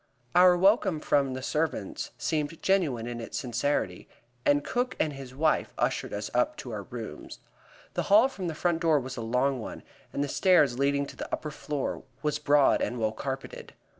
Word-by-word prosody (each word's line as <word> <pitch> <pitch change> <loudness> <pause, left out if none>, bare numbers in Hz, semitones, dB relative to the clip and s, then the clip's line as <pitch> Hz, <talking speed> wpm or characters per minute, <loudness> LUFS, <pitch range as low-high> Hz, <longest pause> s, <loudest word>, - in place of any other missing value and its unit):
Our 180 0 +7
welcome 190 -3 +3
from 140 -3 +1
the 130 - -6
servants 150 -9 -2
seemed 155 0 -2
genuine 155 -12 +1
in 120 -1 -5
its 115 - -5
sincerity, 120 -6 -1 0.4
and 145 0 +4
Cook 250 +1 -1
and 155 - +1
his 135 -2 -9
wife 155 +2 +1
ushered - - -1
us 105 0 -4
up 125 0 +1
to 125 - -7
our 105 -2 -4
rooms. 115 +2 -8 0.6
The - - 0
hall 215 +6 +7
from 195 -9 -5
the 160 - -3
front 170 0 0
door 160 -3 +4
was 130 0 -6
a - - -5
long 125 +4 +1
one, - - -7 0.3
and 140 - -1
the - - -1
stairs 150 -7 +3
leading 140 0 +2
to - - -10
the - - -7
upper 150 - -3
floor 145 -1 -3 0.2
was 150 -1 0
broad 145 -1 +4
and 125 - -1
well 110 -2 0
carpeted. 135 +3 -6
140 Hz, 190 wpm, -28 LUFS, 125-160 Hz, 0.6 s, Our